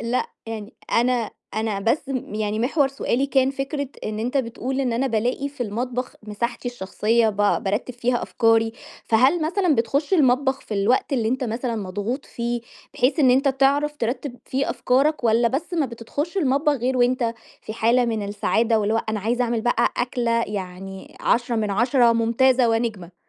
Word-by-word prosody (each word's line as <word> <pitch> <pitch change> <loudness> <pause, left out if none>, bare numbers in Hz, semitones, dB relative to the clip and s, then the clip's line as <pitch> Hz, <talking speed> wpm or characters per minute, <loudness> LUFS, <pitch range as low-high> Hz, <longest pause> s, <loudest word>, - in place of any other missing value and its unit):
لأ، 235 +2 -1 0.2
يعني 220 0 -6 0.2
أنا 240 -1 +2 0.2
أنا 220 -2 -1
بس 250 +7 0
م 255 -5 -4
يعني 215 0 -1
محور 270 +4 +2
سؤالي 275 -1 -1
كان 265 -1 +2
فكرة 275 +1 -3 0.2
إن 215 0 -3
أنت 245 +5 -2
بتقول 260 +1 -2
إن 255 -3 0
أنا 245 +4 0
بالاقي 245 +4 -1
في 280 -3 -5
المطبخ 245 +3 -3
مساحتي 235 +4 -3
الشخصية، 225 +1 +1
با 205 -1 +2
بارتّب 205 +5 -2
فيها 245 0 0
أفكاري، 225 -1 +2 0.3
فهل 260 +9 +3
مثلًا 360 -1 +2
بتخش 275 - +1
المطبخ 265 -3 +3
في 215 - -6
الوقت 210 +8 +1
اللي 235 -5 +1
أنت 260 +2 -1
مثلًا 235 +1 -2
مضغوط 205 +7 -3
فيه، 235 0 -3 0.3
بحيث 260 +7 +1
إن 260 -3 +6
أنت 270 +3 +3
تعرف 280 +2 +2
ترتّب 245 +1 -3
فيه 270 +2 -1
أفكارك، 275 +2 +1
والَّا 230 +1 +4
بس 310 +8 -3
ما 315 -5 +1
بتدخلش 260 - -5
المطبخ 295 -2 +2
غير 260 -1 -1
وأنت 245 -1 +2 0.3
في - - -6
حالة 235 +3 +3
من 225 -3 -1
السعادة، 220 +2 +1
واللي 210 +1 0
هو 225 - +1
أنا 215 -1 -1
عايز 235 +5 -1
أعمل 235 -2 +1
بقى 240 +2 +1
أكلة 240 -2 0
يعني 190 -1 -7
10 240 0 +1
من 215 -2 0
10 240 +3 +3
ممتازة 235 +2 +3
ونجمة. 220 -6 -2
240 Hz, 175 wpm, -23 LUFS, 225-265 Hz, 0.3 s, إن